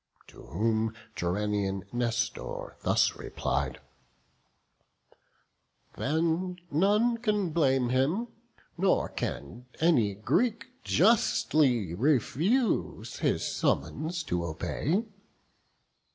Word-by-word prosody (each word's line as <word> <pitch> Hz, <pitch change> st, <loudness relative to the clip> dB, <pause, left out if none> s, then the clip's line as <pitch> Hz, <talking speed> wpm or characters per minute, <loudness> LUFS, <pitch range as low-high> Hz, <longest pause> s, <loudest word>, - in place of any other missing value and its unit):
To -, -, -14 dB
whom 110 Hz, -, 0 dB, 0.2 s
Gerenian 100 Hz, +1 st, -1 dB
Nestor 120 Hz, -1 st, -2 dB
thus -, -, +2 dB
replied; 65 Hz, -1 st, -2 dB, 2.2 s
"Then 165 Hz, +5 st, 0 dB
none 210 Hz, +9 st, +3 dB
can 210 Hz, -6 st, 0 dB
blame 135 Hz, -6 st, +2 dB
him; 150 Hz, -, +1 dB, 0.5 s
nor 190 Hz, 0 st, +2 dB
can 120 Hz, -, -5 dB
any 125 Hz, -, +3 dB
Greek 220 Hz, -, 0 dB, 0.2 s
Justly 150 Hz, -, +3 dB
refuse 155 Hz, -, +1 dB
his -, -, 0 dB
summons 155 Hz, -, -1 dB
to 90 Hz, -8 st, -2 dB
obey." 150 Hz, -, -1 dB
135 Hz, 80 wpm, -29 LUFS, -, 2.2 s, none